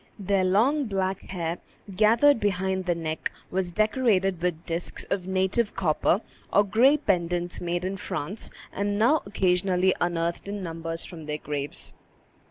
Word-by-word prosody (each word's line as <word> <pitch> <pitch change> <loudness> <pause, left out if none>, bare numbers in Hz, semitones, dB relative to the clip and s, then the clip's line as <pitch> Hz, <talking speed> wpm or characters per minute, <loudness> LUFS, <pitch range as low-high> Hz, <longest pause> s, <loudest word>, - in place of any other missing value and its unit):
Their 195 -1 +1
long 240 +11 +3
black 195 -3 -1
hair, 170 -2 -3 0.4
gathered 230 +7 +5
behind 190 -2 0
the 175 - +2
neck, 160 -1 -3 0.2
was 185 -1 -1
decorated 210 -4 +2
with 175 -2 -1
disks 170 0 -3
of 185 -2 -1
native 190 +4 +1
copper, 175 +3 +2 0.3
or 205 - +5
gay 235 +9 +4
pendants 175 - -1
made 175 +1 -2
in 195 +1 -2
France, 185 +3 -4 0.2
and 205 +1 -1
now 250 +9 +4
occasionally 185 -1 +2
unearthed 170 +1 -1
in 200 -1 -4
numbers 165 -1 -5
from 165 -4 -9
their 150 0 -3
graves. 145 -1 -4
185 Hz, 145 wpm, -26 LUFS, 175-205 Hz, 0.4 s, gathered